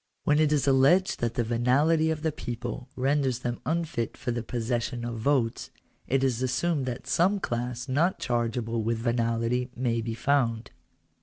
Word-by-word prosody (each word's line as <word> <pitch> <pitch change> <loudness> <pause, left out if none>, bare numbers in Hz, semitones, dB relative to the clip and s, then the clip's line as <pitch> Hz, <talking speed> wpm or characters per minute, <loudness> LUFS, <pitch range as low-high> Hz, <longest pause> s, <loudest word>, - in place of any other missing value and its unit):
When 150 +1 +3
it 155 -1 +3
is 145 -2 +2
alleged 140 +8 +4
that 120 0 -1
the 120 - +1
venality 135 +8 +2
of 160 -1 -2
the 160 - +1
people 120 -2 -6
renders 135 -1 +1
them 120 -1 -4
unfit 160 -8 -2
for 120 - -3
the 120 0 -2
possession 120 +1 -2
of 115 -1 -4
votes, 120 -2 0 0.4
it 135 +1 +1
is 125 -3 +1
assumed 135 +2 0
that 125 0 -4
some 195 +4 +2
class 120 -3 -3
not 155 +8 +1
charge 120 -1 -1
able 115 -1 -2
with 115 +1 0
venality 115 +1 0
may 120 -2 0
be 115 0 -4
found. 120 -3 0
125 Hz, 170 wpm, -27 LUFS, 115-145 Hz, 0.4 s, alleged